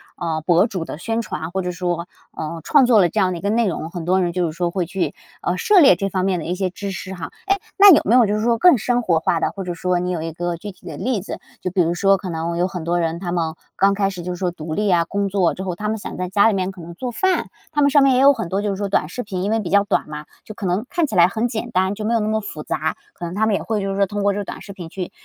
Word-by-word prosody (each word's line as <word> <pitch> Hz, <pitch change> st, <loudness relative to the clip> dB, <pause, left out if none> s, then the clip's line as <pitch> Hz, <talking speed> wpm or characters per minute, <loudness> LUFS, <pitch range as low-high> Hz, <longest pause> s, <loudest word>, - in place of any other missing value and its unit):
啊， 165 Hz, -3 st, -2 dB
博 175 Hz, +3 st, +4 dB
主 185 Hz, -7 st, -4 dB
的 -, -, -7 dB
宣 225 Hz, +6 st, -2 dB
传， 160 Hz, -5 st, -5 dB
或 190 Hz, +1 st, -1 dB
者 180 Hz, 0 st, -3 dB
说， 175 Hz, 0 st, -3 dB, 0.3 s
呃， 160 Hz, +1 st, -5 dB
创 285 Hz, -4 st, +5 dB
作 235 Hz, -4 st, +5 dB
了 175 Hz, -, +3 dB
这 -, -, -1 dB
样 185 Hz, -1 st, +2 dB
的 175 Hz, -, -3 dB
一 -, -, -9 dB
个 200 Hz, -, -1 dB
内 230 Hz, 0 st, +2 dB
容， 165 Hz, -3 st, -3 dB
很 170 Hz, -2 st, -6 dB
多 185 Hz, +2 st, +2 dB
人 175 Hz, -1 st, 0 dB
就 180 Hz, 0 st, 0 dB
是 160 Hz, -, -2 dB
说 170 Hz, +1 st, -1 dB
会 180 Hz, -2 st, -1 dB
去， 185 Hz, +1 st, -2 dB, 0.3 s
呃， -, -, -1 dB
涉 420 Hz, -4 st, +4 dB
猎 270 Hz, -, +7 dB
这 195 Hz, +2 st, -2 dB
方 185 Hz, 0 st, -1 dB
面 190 Hz, -2 st, +1 dB
的 160 Hz, -, -6 dB
一 175 Hz, -, -2 dB
些 185 Hz, -1 st, -1 dB
知 200 Hz, +2 st, -6 dB
识 190 Hz, 0 st, -6 dB
哈。 175 Hz, -3 st, -7 dB, 0.2 s
诶， 395 Hz, -, +4 dB, 0.2 s
那 400 Hz, -2 st, +10 dB
有 -, -, +5 dB
没 230 Hz, -, +4 dB
有 250 Hz, -2 st, +6 dB
就 205 Hz, 0 st, 0 dB
是 215 Hz, -, -1 dB
说 230 Hz, +1 st, +2 dB
更 355 Hz, -2 st, +6 dB
生 245 Hz, +2 st, 0 dB
活 170 Hz, -8 st, +2 dB
化 165 Hz, -, +1 dB
的， -, -, 0 dB
或 195 Hz, -, -6 dB
者 180 Hz, -1 st, -4 dB
说 180 Hz, +1 st, 0 dB
你 180 Hz, +1 st, -2 dB
有 165 Hz, -3 st, -2 dB
一 165 Hz, 0 st, -4 dB
个 175 Hz, +1 st, -3 dB
具 205 Hz, +4 st, -7 dB
体 -, -, -22 dB
的 -, -, -6 dB
例 240 Hz, -6 st, -1 dB
子， -, -, -7 dB, 0.2 s
就 185 Hz, -, -3 dB
比 185 Hz, -1 st, +2 dB
如 170 Hz, +1 st, +1 dB
说 195 Hz, +2 st, +3 dB
可 185 Hz, 0 st, -7 dB
能 170 Hz, 0 st, -3 dB
有 180 Hz, -, +2 dB
很 180 Hz, -3 st, -6 dB
多 175 Hz, +1 st, 0 dB
人， 165 Hz, 0 st, -1 dB
他 175 Hz, -2 st, -4 dB
们 165 Hz, -2 st, -1 dB, 0.2 s
刚 195 Hz, +1 st, +3 dB
开 195 Hz, -1 st, +1 dB
始 180 Hz, -2 st, -7 dB
就 180 Hz, +1 st, -4 dB
是 175 Hz, -, -8 dB
说 180 Hz, -2 st, 0 dB
独 155 Hz, -2 st, -6 dB
立 210 Hz, +4 st, 0 dB
呀、 175 Hz, -3 st, +3 dB
工 200 Hz, +2 st, -1 dB
作 190 Hz, -3 st, +2 dB
之 190 Hz, -, -6 dB
后， 185 Hz, -2 st, -3 dB
他 210 Hz, +4 st, -3 dB
们 220 Hz, -, -1 dB
想 -, -, -7 dB
在 180 Hz, 0 st, -3 dB
家 200 Hz, +3 st, +4 dB
里 225 Hz, -, +3 dB
面 190 Hz, -1 st, -1 dB
可 185 Hz, -3 st, -12 dB
能 170 Hz, +1 st, -9 dB
做 250 Hz, +3 st, -4 dB
饭， 375 Hz, +10 st, 0 dB, 0.2 s
他 295 Hz, -1 st, +1 dB
们 285 Hz, -, +5 dB
上 285 Hz, -1 st, +5 dB
面 270 Hz, -2 st, +4 dB
也 255 Hz, -, +3 dB
有 280 Hz, +1 st, +7 dB
很 225 Hz, -9 st, -4 dB
多 195 Hz, +2 st, -1 dB
就 205 Hz, -, -1 dB
是 -, -, -2 dB
说 200 Hz, 0 st, -2 dB
短 155 Hz, -5 st, +1 dB
视 245 Hz, -, -5 dB
频， 190 Hz, -2 st, -4 dB
因 205 Hz, -, -1 dB
为 225 Hz, -, +2 dB
比 180 Hz, -5 st, -4 dB
较 200 Hz, 0 st, +4 dB
短 200 Hz, -, 0 dB
嘛， 150 Hz, 0 st, -7 dB, 0.2 s
就 215 Hz, -, -8 dB
可 210 Hz, -, -6 dB
能 185 Hz, +6 st, 0 dB
看 345 Hz, -2 st, +1 dB
起 215 Hz, -, -5 dB
来 175 Hz, -1 st, +7 dB
很 220 Hz, +5 st, -1 dB
简 235 Hz, 0 st, -4 dB
单， 190 Hz, +2 st, +1 dB
就 215 Hz, -, -5 dB
没 230 Hz, -, +1 dB
有 230 Hz, -, +3 dB
那 210 Hz, -, -1 dB
么 220 Hz, 0 st, +1 dB
复 155 Hz, -7 st, -7 dB
杂， 160 Hz, +1 st, -2 dB, 0.2 s
可 175 Hz, -, -7 dB
能 170 Hz, -, -5 dB
他 220 Hz, +2 st, +1 dB
们 215 Hz, -, +2 dB
也 -, -, -2 dB
会 215 Hz, -2 st, -1 dB
就 195 Hz, -, -2 dB
是 195 Hz, -, -3 dB
说 200 Hz, -, +4 dB
通 205 Hz, +1 st, -4 dB
过 200 Hz, 0 st, +3 dB
这 205 Hz, 0 st, -3 dB
短 -, -, -8 dB
视 200 Hz, -, -10 dB
频 175 Hz, -3 st, -9 dB
去， 180 Hz, 0 st, -6 dB
190 Hz, 365 characters per minute, -21 LUFS, 175-210 Hz, 0.3 s, 那